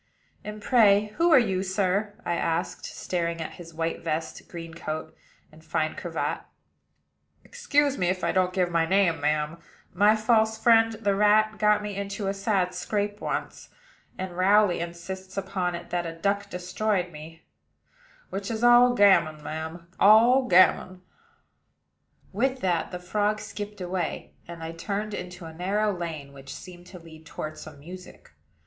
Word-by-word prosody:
"And, 210 0 -8
pray, 210 -4 +4
who 340 +1 +3
are - - +8
you, 195 -7 +2
sir?" 195 +2 -1
I - - 0
asked, 170 +1 -2
staring 170 -2 -3
at 160 - -5
his 165 -1 -11
white 165 0 -3
vest, 160 0 -3
green 165 -1 -8
coat, 155 -1 -6 0.4
and 155 +1 -17
fine 160 -1 -1
cravat. - - -3 1.0
"Excuse 290 - 0
me, 180 - +1
if 185 0 -1
I - - +1
don't 185 -1 +1
give 180 -1 0
my 165 -1 +2
name, 185 -4 +2
ma'am. 150 +2 -1 0.3
My 205 +4 +5
false 220 0 +2
friend, 225 0 +4
the 210 -2 0
rat, 215 +2 +3
got 210 0 +3
me 205 -1 -5
into 200 +1 -4
a 195 - 0
sad 195 -2 0
scrape 205 +3 -3
once; - - -4 0.5
and 185 -1 -5
Rowley 195 +1 +4
insists 185 +3 -7
upon 190 -2 -2
it 170 - -9
that 175 -1 -1
a 165 - -6
duck 200 +2 -1
destroyed 180 0 -2
me, 160 +1 -11 0.9
which 195 0 -4
is 225 0 -3
all 240 +1 +6
gammon, 170 -8 +4
ma'am, 160 +3 -6
all 235 +6 +6
gammon." 185 0 +4 1.3
With 260 +5 0
that, 175 -3 0
the 180 - -5
frog 210 +4 -1
skipped 210 0 -7
away; 180 -1 -4
and 170 -1 -8
I 160 - -5
turned 205 +5 -4
into 180 -2 -7
a 160 - -9
narrow 200 +4 0
lane, 160 -5 -6
which 135 0 -10
seemed 180 -1 -12
to 180 - -11
lead 160 -2 -14
toward 155 -1 -6
some - - -11
music. 180 +5 -12
185 Hz, 160 wpm, -26 LUFS, 170-210 Hz, 1.3 s, are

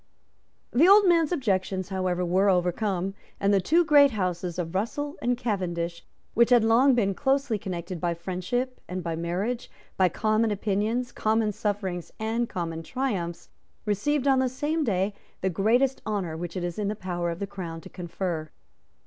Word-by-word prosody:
The 300 +9 +5
old 400 0 +7
man's 335 -3 +4
objections, 190 - -1
however, 185 -2 -1
were 190 +3 +3
overcome; 185 +1 0 0.3
and 200 +1 +2
the 195 - +4
two 335 - +3
great 290 -2 +7
houses 180 -5 -2
of 170 -2 -3
Russell 285 +9 -2
and 245 0 +1
Cavendish, 175 -7 -2 0.3
which 235 +1 +4
had 240 -3 +6
long 245 +4 +5
been 200 -5 +2
closely 270 -1 +1
connected 175 -2 -5
by 170 -1 0
friendship 190 +9 -3
and 180 0 -4
by 165 -1 -2
marriage, 185 +9 -2 0.3
by 185 -1 +4
common 215 +4 +1
opinions, 215 +4 -1
common 220 0 +1
sufferings 195 -4 -3
and 225 +2 -1
common 165 -3 -4
triumphs, 185 -5 -3 0.4
received 255 +8 0
on 265 -1 +5
the 260 -1 +2
same 295 +5 -1
day 200 -4 0 0.3
the 190 - 0
greatest 240 +9 +2
honour 195 -7 -2
which 175 +2 -5
it 180 - -3
is 175 +2 -3
in 205 - -1
the 210 - -1
power 175 -3 -3
of 170 - -3
the 200 - -3
Crown 180 -5 -6
to - - -11
confer. 175 -3 -4
200 Hz, 170 wpm, -26 LUFS, 180-245 Hz, 0.4 s, old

